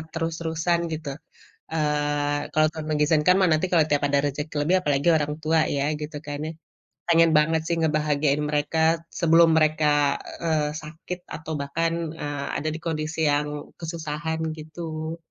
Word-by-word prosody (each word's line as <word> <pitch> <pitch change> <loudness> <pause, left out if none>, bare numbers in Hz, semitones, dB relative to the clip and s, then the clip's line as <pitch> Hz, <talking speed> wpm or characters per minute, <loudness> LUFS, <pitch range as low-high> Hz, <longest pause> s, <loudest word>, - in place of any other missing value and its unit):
terus-terusan 165 +1 -1
gitu, 155 -2 -5 0.6
eee, 145 -1 0
kalau 155 0 +4
Tuhan 155 -1 -6
mengizinkan 150 +3 +3
mah 190 - +5
nanti 155 +4 +2
kalau 165 -3 +5
tiap 145 -1 +2
ada 140 0 +2
rezeki 145 +2 -4
lebih 185 - +4
apalagi 145 0 +1
orang 150 -1 -1
tua 160 +1 +3 0.2
ya, 140 - 0 0.2
gitu 150 0 -5
kan 145 0 -4
ya. 160 - -5 0.6
Pengen 165 -1 +5
banget 160 +1 +3
sih 170 - +1
ngebahagiain 150 -2 +1
mereka 150 +2 0 0.4
sebelum 165 -1 +6
mereka, 150 -2 +3 0.2
eee, 155 -3 +1
sakit 160 +4 -7 0.2
atau 160 0 -6
bahkan, 165 +4 -1 0.3
eee, 145 -1 -3 0.2
ada 155 - -1
di - - -6
kondisi 155 0 -3
yang 150 0 -2
kesusahan 160 -1 -4 0.2
gitu. 160 +1 -6
155 Hz, 150 wpm, -25 LUFS, 150-160 Hz, 0.6 s, sebelum